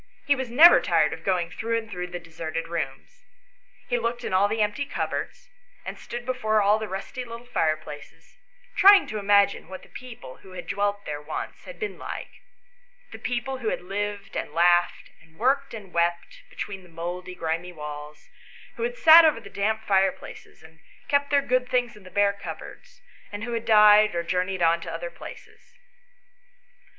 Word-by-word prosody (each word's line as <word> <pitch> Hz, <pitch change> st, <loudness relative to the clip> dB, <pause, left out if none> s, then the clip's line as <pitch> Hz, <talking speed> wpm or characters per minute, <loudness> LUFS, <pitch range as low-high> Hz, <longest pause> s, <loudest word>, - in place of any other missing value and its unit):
He 285 Hz, -, +4 dB
was 260 Hz, -2 st, -4 dB
never 310 Hz, +9 st, +8 dB
tired 160 Hz, -3 st, +2 dB
of 160 Hz, 0 st, -9 dB
going 175 Hz, -2 st, 0 dB
through 230 Hz, 0 st, -2 dB
and 225 Hz, -1 st, -5 dB
through 180 Hz, -4 st, -5 dB
the 180 Hz, 0 st, -6 dB
deserted 165 Hz, -1 st, -6 dB
rooms. 170 Hz, -, -6 dB, 0.6 s
He -, -, 0 dB
looked 240 Hz, -, -3 dB
in -, -, -4 dB
all 190 Hz, +2 st, +4 dB
the 220 Hz, +2 st, -2 dB
empty 210 Hz, +7 st, -1 dB
cupboards, -, -, -4 dB, 0.4 s
and -, -, -7 dB
stood 240 Hz, 0 st, -7 dB
before 240 Hz, -4 st, +1 dB
all 205 Hz, +1 st, +3 dB
the 220 Hz, -, -4 dB
rusty 195 Hz, +7 st, -6 dB
little 235 Hz, 0 st, -9 dB
fireplaces, 155 Hz, -4 st, -4 dB, 0.4 s
trying 400 Hz, 0 st, +8 dB
to 215 Hz, -, -5 dB
imagine 200 Hz, -2 st, +3 dB
what 185 Hz, +1 st, -9 dB
the -, -, -17 dB
people, 240 Hz, -, -11 dB
who 190 Hz, -, -15 dB
had 180 Hz, -, -7 dB
dwelt 205 Hz, 0 st, -1 dB
there 145 Hz, -1 st, -5 dB
once, 150 Hz, -, -6 dB
had -, -, -10 dB
been 425 Hz, -, -5 dB
like; -, -, -6 dB, 0.8 s
the -, -, -9 dB
people 250 Hz, +2 st, -3 dB
who 225 Hz, -3 st, -1 dB
had -, -, -3 dB
lived, 200 Hz, +1 st, -4 dB
and 150 Hz, -, -4 dB
laughed, 175 Hz, +1 st, +2 dB
and 160 Hz, 0 st, -23 dB
worked, 275 Hz, +3 st, +1 dB
and 205 Hz, -5 st, -10 dB
wept, 170 Hz, 0 st, -1 dB
be -, -, -19 dB
tween 195 Hz, -2 st, -5 dB
the 180 Hz, -, -18 dB
mouldy 175 Hz, +2 st, -6 dB
grimy 170 Hz, +1 st, -3 dB
walls; 150 Hz, -2 st, -9 dB, 0.5 s
who -, -, -6 dB
had 485 Hz, +1 st, -2 dB
sat 335 Hz, -8 st, +9 dB
over 310 Hz, -7 st, +3 dB
the 200 Hz, -3 st, -13 dB
damp 220 Hz, +2 st, -1 dB
fireplaces, 195 Hz, -5 st, -1 dB
and 160 Hz, 0 st, -17 dB, 0.3 s
kept 285 Hz, 0 st, +2 dB
their 285 Hz, -1 st, +3 dB
good 255 Hz, -1 st, 0 dB
things 245 Hz, -2 st, 0 dB
in 210 Hz, -, -15 dB
the 185 Hz, -, -13 dB
bare 200 Hz, +1 st, +2 dB
cupboards, -, -, -10 dB, 0.3 s
and 205 Hz, +1 st, -6 dB
who 240 Hz, -, -4 dB
had 230 Hz, -1 st, -3 dB
died 210 Hz, -2 st, +6 dB
or 170 Hz, -, -1 dB
journeyed 180 Hz, +1 st, -1 dB
on 165 Hz, 0 st, +3 dB
to 165 Hz, -, -6 dB
other 170 Hz, +1 st, -5 dB
places. 485 Hz, -, -13 dB
200 Hz, 185 wpm, -25 LUFS, 170-240 Hz, 0.8 s, sat